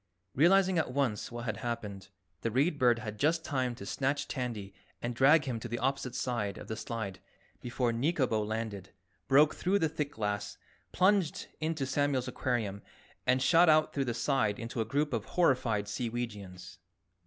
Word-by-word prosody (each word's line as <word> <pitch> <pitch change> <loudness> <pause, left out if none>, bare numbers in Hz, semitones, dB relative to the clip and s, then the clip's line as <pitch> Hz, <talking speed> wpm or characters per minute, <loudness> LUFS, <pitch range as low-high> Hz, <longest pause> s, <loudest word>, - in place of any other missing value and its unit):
Realizing 185 +4 +4
at 155 - -1
once 125 -6 -1
what 120 0 -6
had 110 -3 -2
happened, 105 -5 -5 0.3
the 115 - 0
Read 145 +7 +1
Bird 120 -2 +4
had 110 -2 -6
just 160 +3 +2
time 130 -4 -1
to 100 - -9
snatch 140 +6 -1
Tandy 115 -7 -4 0.3
and 120 0 -3
drag 145 +6 +5
him 125 -4 -2
to 120 - -6
the 120 0 -3
opposite 130 0 -1
side 110 -6 -2
of - - -9
the 110 - -3
slide 110 -6 -5 0.4
before 120 -1 -1
Nikobo 125 -3 +1
landed 105 -3 -4 0.3
broke 145 +3 +5
through 190 +3 +1
the 165 - +2
thick 150 -2 -3
glass, 105 -3 -3 0.3
plunged 190 -3 +2
into 155 -3 -1
Samuel's 135 -1 0
aquarium 115 -5 -2 0.5
and 130 0 +3
shot 165 +3 +6
out 155 0 +4
through 140 -2 0
the 120 -2 -2
side 115 -3 +1
into 115 0 -4
a - - -1
group 145 +5 0
of 110 -2 -1
horrified 125 -11 +1
Seeweegians. 105 -5 -5
125 Hz, 170 wpm, -31 LUFS, 110-145 Hz, 0.5 s, shot